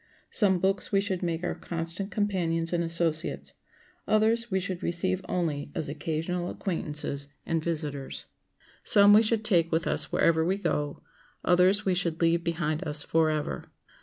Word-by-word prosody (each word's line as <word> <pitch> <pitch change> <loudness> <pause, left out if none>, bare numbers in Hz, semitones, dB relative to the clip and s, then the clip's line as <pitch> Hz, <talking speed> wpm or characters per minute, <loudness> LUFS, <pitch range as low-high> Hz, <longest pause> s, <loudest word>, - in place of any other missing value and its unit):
Some 195 -4 +3
books 190 +1 0
we 195 - +4
should 195 -2 -2
make 170 -1 -2
our - - -1
constant 170 +3 -5
companions 180 -5 -1
and 170 0 +1
associates; 165 -1 -2 0.5
others 225 +2 +2
we 190 -2 +1
should 185 -1 -4
receive 185 +2 -1
only 150 -5 -2
as 155 - -2
occasional 165 +4 -2
acquaintances 150 -5 -3 0.2
and 165 -1 -1
visitors. 145 - -3 0.6
Some 205 0 +6
we 215 - +8
should 220 -1 0
take 170 -6 +3
with 165 +2 +1
us - - +1
wherever 160 -1 +3
we 185 +4 +1
go; 145 -7 -2 0.4
others 185 +4 +4
we 190 - +2
should 170 -3 -1
leave 170 0 +2
behind 165 -1 -1
us 150 0 +1
forever. 155 -1 0
170 Hz, 155 wpm, -28 LUFS, 160-190 Hz, 0.6 s, we